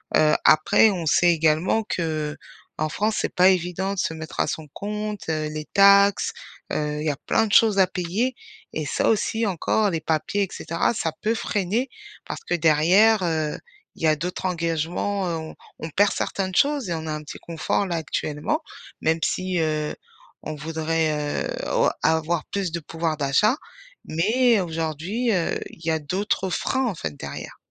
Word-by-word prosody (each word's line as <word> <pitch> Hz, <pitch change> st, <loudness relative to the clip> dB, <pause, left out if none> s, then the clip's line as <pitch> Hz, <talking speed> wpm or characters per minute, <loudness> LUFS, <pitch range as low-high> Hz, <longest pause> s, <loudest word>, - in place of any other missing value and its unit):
Heu, 155 Hz, 0 st, +5 dB
après 155 Hz, +9 st, +5 dB
on 175 Hz, -4 st, -3 dB
sait 175 Hz, +3 st, +5 dB
également 160 Hz, +7 st, +2 dB
qu'en 155 Hz, -3 st, -4 dB
France 215 Hz, +7 st, 0 dB
c'est -, -, -3 dB
pas 180 Hz, +1 st, +6 dB
évident 185 Hz, +1 st, 0 dB
de -, -, -4 dB
se 160 Hz, -, 0 dB
mettre 160 Hz, 0 st, -8 dB
à -, -, +3 dB
son 160 Hz, -1 st, -4 dB
compte, 210 Hz, 0 st, -4 dB
heu, 155 Hz, -1 st, -1 dB
les 155 Hz, 0 st, -5 dB
taxes, 200 Hz, 0 st, +5 dB, 0.4 s
heu, 150 Hz, 0 st, -1 dB
il -, -, -4 dB
y -, -, +3 dB
a 145 Hz, -, -2 dB
plein 225 Hz, -, +2 dB
de 205 Hz, -, -4 dB
choses 210 Hz, -1 st, +5 dB
à 190 Hz, -, +6 dB
payer 190 Hz, +8 st, -1 dB, 0.4 s
et 155 Hz, -, -3 dB
ça -, -, +1 dB
aussi, 225 Hz, +1 st, +1 dB
encore, 205 Hz, +3 st, +1 dB
les 165 Hz, -4 st, -1 dB
papiers 160 Hz, +6 st, 0 dB
et -, -, -2 dB
cetera 165 Hz, +7 st, -1 dB
ça 165 Hz, -7 st, -1 dB
peut 220 Hz, -, +2 dB
freiner, 215 Hz, +3 st, -1 dB, 0.4 s
parce -, -, -5 dB
que -, -, 0 dB
derrière, 175 Hz, +7 st, +4 dB
heu, 160 Hz, -3 st, -1 dB, 0.4 s
il -, -, -10 dB
y -, -, +4 dB
a 155 Hz, -, +4 dB
d'autres 180 Hz, +5 st, -4 dB
engagements, 175 Hz, +3 st, -1 dB
heu, 170 Hz, -, -1 dB
on 160 Hz, 0 st, -7 dB, 0.2 s
on 160 Hz, -, -5 dB
perd 200 Hz, +6 st, +3 dB
certaines 190 Hz, -1 st, -2 dB
choses 285 Hz, -7 st, +2 dB
et -, -, 0 dB
on 160 Hz, -1 st, -4 dB
a -, -, -2 dB
un 155 Hz, -, -4 dB
petit 150 Hz, -, -9 dB
confort 170 Hz, +4 st, -1 dB
là 175 Hz, -, -2 dB
actuellement. 155 Hz, -, -2 dB, 0.4 s
Même 160 Hz, +1 st, +1 dB
si, 185 Hz, -1 st, -1 dB
heu, 155 Hz, -1 st, -1 dB, 0.5 s
on 155 Hz, -, -5 dB
voudrait, 155 Hz, -1 st, -1 dB
heu, -, -, -10 dB, 0.2 s
au -, -, +4 dB
avoir 160 Hz, +1 st, +1 dB
plus 195 Hz, -4 st, -3 dB
de 170 Hz, -, -3 dB
pouvoir 160 Hz, 0 st, -3 dB
d'achat 145 Hz, -, +3 dB, 0.5 s
mais 225 Hz, +8 st, +3 dB
aujourd'hui, 165 Hz, -, -2 dB
heu, 175 Hz, -4 st, 0 dB
il -, -, -16 dB
y 165 Hz, -, +2 dB
a 160 Hz, -, +1 dB
d'autres 190 Hz, +5 st, -1 dB
freins, 260 Hz, +8 st, 0 dB
en 210 Hz, -, -2 dB
fait, 80 Hz, -, -4 dB
derrière. -, -, -7 dB
170 Hz, 185 wpm, -24 LUFS, 155-200 Hz, 0.5 s, pas